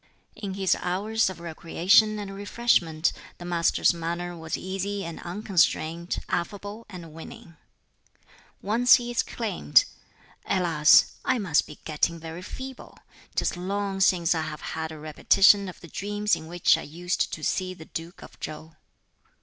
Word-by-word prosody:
In 200 -3 -5
his 190 -1 +2
hours 205 +4 0
of 185 - -8
recreation 175 +6 +2
and 200 -1 -6
refreshment 195 -6 +1 0.2
the 175 - -9
Master's 175 -1 +2
manner 170 +1 -4
was 160 -1 -4
easy 195 +2 -3
and 170 -1 -7
unconstrained, 175 -3 0
affable 205 +5 -4
and 170 -5 -10
winning. 165 +1 -11 1.1
Once 230 +5 +5
he 240 -1 -2
exclaimed, 230 - +2 0.6
"Alas! 165 -5 +4
I 255 - +1
must 180 -8 +1
be 150 - -11
getting 165 +2 0
very 165 +2 -8
feeble; 260 +7 -9 0.4
'tis - - 0
long 195 +2 -3
since 180 -3 +3
I 160 - -1
have 155 -1 -6
had 160 0 -4
a 160 - -8
repetition 190 +6 +4
of 180 - -11
the 170 - -11
dreams 205 +4 -1
in 160 - -9
which 175 +1 +3
I - - -6
used 175 +4 -2
to 155 - -6
see 185 +2 -1
the 160 - -12
Duke 165 +3 -8
of - - -14
Chow. 155 +1 -7
180 Hz, 150 wpm, -26 LUFS, 165-205 Hz, 1.1 s, Once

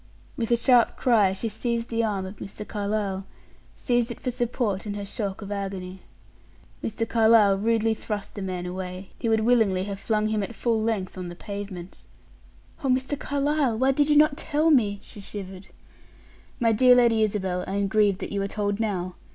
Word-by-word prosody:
With 230 -2 -2
a 235 - +4
sharp 240 0 +4
cry, 220 -6 +4
she 195 +4 -3
seized 235 +2 -2
the 230 0 0
arm 200 -4 -1
of 190 +2 -8
Mr. 200 +3 -8
Carlyle 200 -2 -2 0.5
seized 240 -2 0
it 235 - -6
for 250 - -2
support 230 -4 -2
in 205 - -3
her 205 -1 -5
shock 200 0 -4
of 200 - -8
agony. 190 -2 -5 0.8
Mr. 225 +1 -2
Carlyle 220 -3 +5
rudely 225 +2 +1
thrust 210 -2 -5
the 205 - -6
man 185 -2 -4
away; 185 +1 -6
he 230 - -1
would 220 -1 +3
willingly 220 -5 +3
have 200 0 -5
flung 215 0 0
him 215 -1 0
at 210 +4 -5
full 230 -1 0
length 205 -5 -2
on 180 - -5
the 175 - -8
pavement. 195 -2 -8 0.8
"Oh, - - 0
Mr. 260 +3 +1
Carlyle, 285 -3 0
why 260 +3 +3
did 290 +2 +2
you 295 - +4
not 300 -1 +5
tell 310 +2 +1
me?" 210 -8 +3
she 205 - -10
shivered. 190 -1 -8 0.9
"My 230 -2 +3
dear 250 +3 +6
Lady 235 -3 +4
Isabel, 190 -4 0
I 195 - -3
am 200 0 +1
grieved 205 -2 +2
that - - -5
you 200 - -1
are 195 - -1
told 205 0 -2
now. 185 -5 -2
215 Hz, 190 wpm, -25 LUFS, 195-235 Hz, 0.9 s, dear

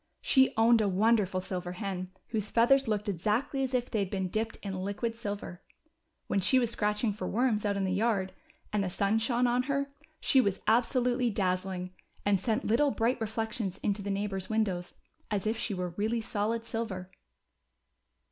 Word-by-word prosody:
She 265 -1 +4
owned 225 0 +5
a 210 - +2
wonderful 200 -1 +2
silver 180 -1 -4
hen, 185 -2 -4 0.2
whose 215 -2 -2
feathers 265 +3 +4
looked 210 -1 -1
exactly 215 - 0
as 260 -1 0
if 245 -1 -1
they 220 - 0
had 195 -2 -1
been 190 -2 -2
dipped 220 +4 -2
in 195 -2 -4
liquid 205 +4 -2
silver. 205 -5 -5 0.6
When 200 - 0
she 195 +8 +4
was 240 -3 +2
scratching 210 0 +1
for 210 - -5
worms 220 -2 +1
out 200 -1 0
in 195 - 0
the 185 -1 0
yard, 195 -2 +1 0.4
and 205 -1 +2
the 185 - -1
sun 200 +4 +1
shone 240 +2 +1
on 245 +1 +3
her, 280 0 0 0.3
she 265 - +4
was 200 -5 0
absolutely 245 +2 +2
dazzling, 185 -2 -1 0.3
and 200 -2 +3
sent 220 +6 -1
little 280 +7 +3
bright 245 -1 0
re 225 - 0
flections 220 -3 -3
into 205 0 0
the 200 - -4
neighbors' 195 -1 -2
windows, 195 -5 -1 0.3
as 205 -2 -1
if 220 +1 +1
she 225 -3 -2
Avere 180 -2 -4
really 220 +4 0
solid 225 +1 -1
silver. 195 -6 -4
215 Hz, 185 wpm, -30 LUFS, 195-235 Hz, 0.6 s, owned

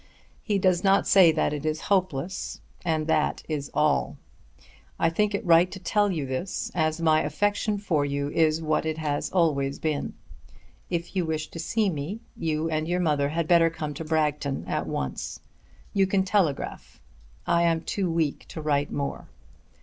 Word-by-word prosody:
He 210 -3 0
does 185 -2 +2
not 195 0 +4
say 185 -4 +7
that 155 -1 0
it 150 -1 -4
is 155 0 -1
hopeless, 185 -3 -1 0.2
and 160 -3 0
that 155 -1 +1
is 150 -3 -3
all. 150 0 +1 0.8
I 165 - +2
think 205 +4 +1
it 200 - -4
right 170 +1 +5
to - - -6
tell 205 +2 +1
you 155 -6 -2
this, 130 +8 -3
as 155 -1 0
my 160 -1 +4
affection 205 +7 0
for 170 -8 0
you 140 0 -1
is 160 0 +2
what 155 0 +1
it 155 0 -2 0.3
always 140 -6 +1
has - - -10
been. 155 -2 -2 0.7
If 170 +1 -3
you 185 - +2
wish 155 -1 -2
to 165 - -8
see 205 +4 +1
me, 160 +8 -4 0.2
you 155 0 -1
and 155 -1 -1
your 175 +1 0
mother 150 -5 +1
had 165 +1 -1
better 170 -1 +5
come 155 -2 -5
to 155 - -6
Bragton 150 -3 -1
at - - -2
once. 65 -2 -4 0.5
You 195 -1 +3
can 190 0 +2
telegraph. 185 -8 -1 0.5
I 170 0 +3
am 165 -1 +2
too 190 +1 -2
weak 165 -3 -1
to - - -8
write 145 -2 0
more. 140 -1 -4
160 Hz, 175 wpm, -26 LUFS, 150-185 Hz, 0.8 s, say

